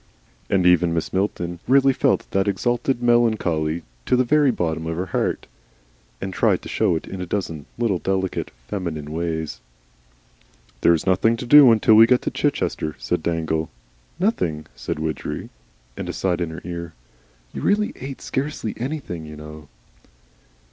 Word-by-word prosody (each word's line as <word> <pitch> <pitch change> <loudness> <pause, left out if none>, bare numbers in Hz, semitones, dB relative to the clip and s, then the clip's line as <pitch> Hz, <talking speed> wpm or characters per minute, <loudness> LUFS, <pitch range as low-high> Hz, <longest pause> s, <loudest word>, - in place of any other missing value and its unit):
And 95 -2 +2
even 90 -1 +4
Mrs. 80 - -2
Milton 90 -3 -1
really 135 +1 +5
felt - - +1
that 95 +1 +1
exalted 120 +4 0
melancholy 90 -10 +2 0.2
to - - +4
the 125 - +3
very 145 +3 +3
bottom 80 -7 -1
of 80 0 -3
her 90 - -1
heart, 90 - -1 0.7
and 95 - -5
tried - - +2
to - - -8
show - - +1
it 80 - -4
in 95 - -6
a 90 - -4
dozen 85 -7 -3
little, 115 -7 +1
delicate, 95 0 -1 0.2
feminine 80 -7 -4
ways. 80 -5 -3 1.2
"There 85 - +5
is 80 - -4
nothing 95 +5 +3
to 125 - -5
do 140 0 +9
until 110 0 +4
we 110 +1 +8
get 125 0 +3
to - - -1
Chichester," 75 -1 -1
said - - -2
Dangle. 80 -1 -1 0.5
"Nothing." 175 - +1
"Nothing," - - -17
said - - -4
Widgery, 80 -1 -4 0.5
and - - -5
aside 90 -2 -1
in 85 - -1
her 80 +2 -8
ear: 85 -1 -6 0.6
"You - - -5
really 210 +1 +1
ate 135 +1 -7
scarcely 135 -5 -3
anything, 120 - -5
you 75 - -9
know." 75 0 -10
90 Hz, 160 wpm, -22 LUFS, 80-120 Hz, 1.2 s, do